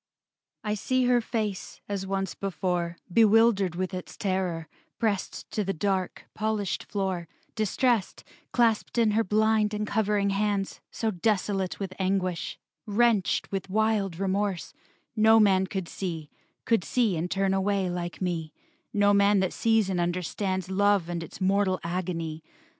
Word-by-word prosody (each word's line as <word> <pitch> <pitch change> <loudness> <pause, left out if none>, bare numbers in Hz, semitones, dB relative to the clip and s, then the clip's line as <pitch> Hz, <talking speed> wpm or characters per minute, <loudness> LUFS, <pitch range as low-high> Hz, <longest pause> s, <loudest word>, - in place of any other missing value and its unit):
V 210 - -2
I - - +2
see 255 +4 +1
her 245 -1 +4
face, 215 -4 -3
as 195 -1 -3
once 195 -1 -2
before, 180 -3 -2 0.2
Bewildered 220 -4 +4
with 185 +1 -2
its 180 -1 -7
terror, 185 -4 -1 0.3
pressed 210 -4 -2
To 210 - -1
the 195 0 -2
dark, 190 +1 -1
polished 215 -3 -2
floor; 190 -4 -2 0.3
distressed, 220 0 0 0.3
Clasped 230 -1 +1
in 225 -2 +4
her 225 +2 +2
blind 215 +1 +2
and 210 0 -1
covering 205 -1 +1
hands; 200 -1 -1
So 225 -1 -1
desolate 195 -1 0
with 195 -2 -4
anguish, 185 -2 -1 0.3
wrenched 215 -1 +2
With 195 -1 -3
wild 210 -3 +1
remorse, 195 -1 -1 0.4
no 220 0 +6
man 190 -3 +4
could 190 -3 -4
see, 165 -6 -5 0.3
Could 230 -6 +2
see 230 -4 +1
and 165 +2 -2
turn 195 0 +1
away 195 0 +1
like 175 0 -4
me, 165 -4 -2 0.4
No 205 0 +3
man 200 0 +4
that 190 - 0
sees 225 -3 +2
and 185 -2 -1
understands 185 +2 -2
Love 200 -2 +2
and 170 -1 -3
its 165 - -9
mortal 190 0 +2
agony. 165 -2 -3
195 Hz, 145 wpm, -27 LUFS, 185-210 Hz, 0.4 s, no